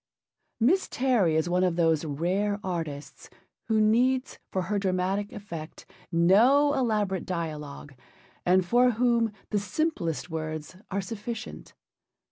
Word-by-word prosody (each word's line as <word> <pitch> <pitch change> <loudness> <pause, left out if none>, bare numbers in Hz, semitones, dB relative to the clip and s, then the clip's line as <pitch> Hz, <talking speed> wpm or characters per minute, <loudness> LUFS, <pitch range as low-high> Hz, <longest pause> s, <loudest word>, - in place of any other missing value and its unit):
Miss 325 +12 +3
Terry 240 -11 +2
is 160 +2 +1
one 180 +1 +1
of 180 -2 +1
those 165 -2 +2
rare 185 +8 -1
artists 160 -6 -5 0.4
who 220 -1 +2
needs 250 +5 +2
for 185 - -1
her 200 +3 -1
dramatic 190 +1 -1
effect 165 -6 -8 0.3
no 235 +13 +5
elaborate 210 - 0
dialogue, 150 -5 -5 0.5
and 185 +1 +3
for 245 +5 +4
whom 235 -1 +2 0.2
the 210 - +2
simplest 200 - -2
words 155 0 -5
are 200 +1 -1
sufficient. 225 +3 -7
190 Hz, 120 wpm, -27 LUFS, 170-230 Hz, 0.5 s, no